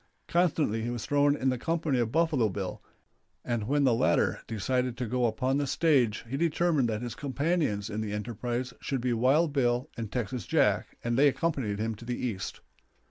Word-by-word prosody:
Constantly 160 -10 +1
he 115 - -2
was 120 -3 -4
thrown 145 0 +3
in 135 -2 0
the 130 -1 -1
company 160 -3 0
of 115 -2 0
Buffalo 155 -8 +2
Bill, 95 -1 -5 0.6
and 115 -3 -2
when 145 +2 +2
the 130 -3 +4
latter 115 - +2
decided 125 +3 -1
to 125 - -2
go 125 +1 +1
upon 130 +5 0
the 145 -1 0
stage 130 -10 +2
he 135 +4 -3
determined 165 -5 +2
that 110 +1 -2
his 120 -2 -4
companions 140 - -1
in 110 0 -3
the 105 -1 -3
enterprise 120 +4 -3
should 135 - -2
be 125 0 0
Wild 140 +7 +3
Bill 125 0 +1
and 110 -3 -5
Texas 125 -3 -3
Jack, - - +1
and 120 +1 0
they 145 - +7
accompanied 135 -8 0
him 110 +1 -1
to 110 +2 -11
the 125 0 -3
East. 105 -7 -4
125 Hz, 190 wpm, -29 LUFS, 115-145 Hz, 0.6 s, they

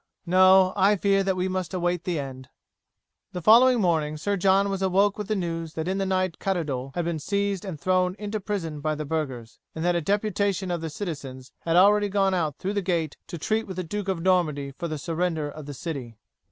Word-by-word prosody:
No; 185 +1 +5
I 200 +1 +4
fear 195 0 +2
that 190 -1 0
we 185 0 -1
must 185 -1 -3
await 175 -1 -1
the 175 -3 -1
end." 130 -2 -6 0.8
The 180 - -4
following 245 +5 +6
morning 160 -5 +1
Sir 200 +7 -1
John 195 +1 +3
was 195 -1 -3
awoke 195 +2 +3
with 210 -2 -5
the 215 - 0
news 165 -4 -4
that 160 +1 -3
in 190 +1 -1
the 195 - 0
night 185 -2 0
Caddoudal 145 -9 -2
had 175 -1 -1
been 170 -2 -2
seized 200 +3 -1
and 185 -7 -6
thrown 185 +1 +1
into 210 +1 -4
prison 185 -7 -4
by 155 +1 -1
the 150 0 -5
burghers, 135 -7 -4 0.2
and 160 +1 -3
that 175 0 +2
a 170 - +1
deputation 200 0 0
of 165 -2 -3
citizens 135 -8 -6
had 165 0 -1
already 205 +3 +5
gone 195 -1 +2
out 160 -6 -1
through 195 +2 -3
the 205 - 0
gate 170 -5 -1
to 170 - -6
treat 220 +7 -1
with 190 - -6
the 185 - -3
Duke 200 +4 -4
of 185 -4 -2
Normandy 155 -7 +1
for 170 +5 -5
the 155 -1 -4
surrender 165 0 -2
of 150 0 -10
the 145 - -6
city. 130 -7 -6
180 Hz, 220 wpm, -25 LUFS, 155-195 Hz, 0.8 s, following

